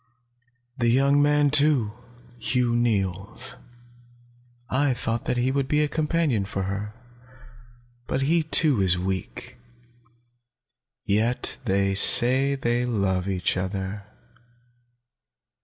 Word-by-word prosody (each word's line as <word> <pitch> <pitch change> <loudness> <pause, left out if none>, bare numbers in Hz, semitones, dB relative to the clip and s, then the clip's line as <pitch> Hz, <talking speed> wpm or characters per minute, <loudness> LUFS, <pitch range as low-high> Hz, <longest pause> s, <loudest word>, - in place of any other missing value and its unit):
"The 120 -1 +2
young 140 +4 +3
man, 145 0 +2
too, 140 -7 +2 0.5
Hugh 125 +1 0
Neils. 100 -4 -2 1.1
I 135 0 0
thought 120 +1 -3
he 125 +2 0
would 135 -1 -1
be 150 +2 +1
a - - 0
companion 150 -7 -1
for 95 -1 -4
her. 100 +3 -5 1.1
But 135 - -2
he 165 +4 +2
too 150 -6 +2
is 90 -1 +3
weak. 95 +1 -5 1.5
Yet 110 +5 0
they 100 -1 +1
say 130 +7 +5
they 120 -2 -1
love 100 -6 -1
each 90 -3 -1
other. 95 +2 -5
120 Hz, 105 wpm, -24 LUFS, 100-140 Hz, 1.5 s, say